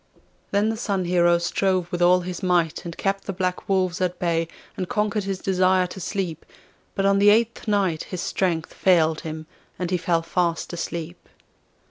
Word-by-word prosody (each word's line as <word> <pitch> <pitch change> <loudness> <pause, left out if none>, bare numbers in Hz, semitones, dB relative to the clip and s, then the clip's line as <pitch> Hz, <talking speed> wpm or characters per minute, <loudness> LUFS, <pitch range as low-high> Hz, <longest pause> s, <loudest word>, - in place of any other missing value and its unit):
Then 205 +2 +2
the 225 - -2
Sun 200 -5 -1
Hero 175 -1 +4
strove 180 +1 0
with 175 - -2
all 180 +1 +5
his 180 -1 -6
might 175 -4 +1
and 170 -1 -6
kept 195 0 -1
the - - -2
black 185 0 -3
wolves 185 -2 +1
at 180 -1 0
bay, 165 -2 0 0.3
and 185 - -4
conquered 210 -1 0
his 195 -1 -2
desire 185 0 +2
to 180 - -8
sleep; 180 -3 -3 0.5
but 195 - 0
on 200 0 +4
the 205 +1 +6
eighth 230 +2 +2
night 195 -6 +1
his 180 -2 -5
strength 170 -4 -1
failed 160 -4 +3
him, 155 0 -6 0.3
and 180 -1 -3
he 180 - +2
fell 170 -1 0
fast 170 0 -1
asleep. 170 0 -6
180 Hz, 180 wpm, -24 LUFS, 170-195 Hz, 0.5 s, the